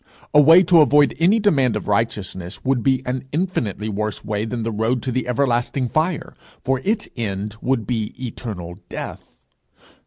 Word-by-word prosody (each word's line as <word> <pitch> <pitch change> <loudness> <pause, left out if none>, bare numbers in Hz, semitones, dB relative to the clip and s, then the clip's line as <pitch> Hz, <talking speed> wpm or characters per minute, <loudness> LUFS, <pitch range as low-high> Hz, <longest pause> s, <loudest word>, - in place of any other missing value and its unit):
A 150 - +8
way 165 +5 +7
to 170 -2 +6
avoid 145 -1 +4
any 190 +7 +4
demand 135 - +2
of 105 - -4
righteousness 100 -3 -2
would 130 -2 +1
be 130 +1 +1
an 125 +1 -3
infinitely 130 - -2
worse 105 0 -3
way 105 0 -2
than 115 0 -4
the 115 - -2
road 110 +3 -1
to 130 - -2
the 125 0 -2
everlasting 125 0 0
fire, 160 +4 -1 0.3
for 130 0 0
its 210 +1 0
end 105 -2 -3
would 125 -4 0
be 110 -4 -3
eternal 100 -8 -6
death. - - -8
125 Hz, 165 wpm, -21 LUFS, 105-140 Hz, 0.3 s, A